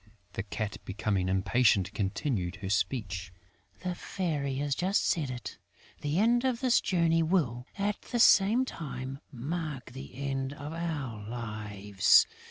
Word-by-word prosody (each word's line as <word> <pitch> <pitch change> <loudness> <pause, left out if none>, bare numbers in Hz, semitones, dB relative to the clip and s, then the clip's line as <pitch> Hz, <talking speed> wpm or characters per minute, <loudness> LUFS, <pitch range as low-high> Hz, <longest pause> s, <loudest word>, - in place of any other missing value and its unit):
The - - -2
Cat, 105 +1 -4
becoming 95 -2 -1
impatient, 100 +1 +3
continued 100 - -1
her 100 -1 -5
speech: 95 -5 -1 0.5
"The 180 -1 -2
Fairy 155 -7 -2
has 145 +1 0
just 185 +7 +1
said 155 -5 +1
it, 125 -1 -6 0.4
the 145 +2 -1
end 235 +4 +4
of 255 -3 +1
this 250 -2 +3
journey 165 -2 +2
will, 145 -8 +1
at 205 +1 -1
the 245 - -3
same 225 +3 +6
time, 135 - -6
mark 140 0 -4
the 130 0 -9
end 135 0 -2
of 145 +2 -7
our 150 -10 -3
lives. 105 -4 +3
135 Hz, 140 wpm, -30 LUFS, 105-170 Hz, 0.5 s, same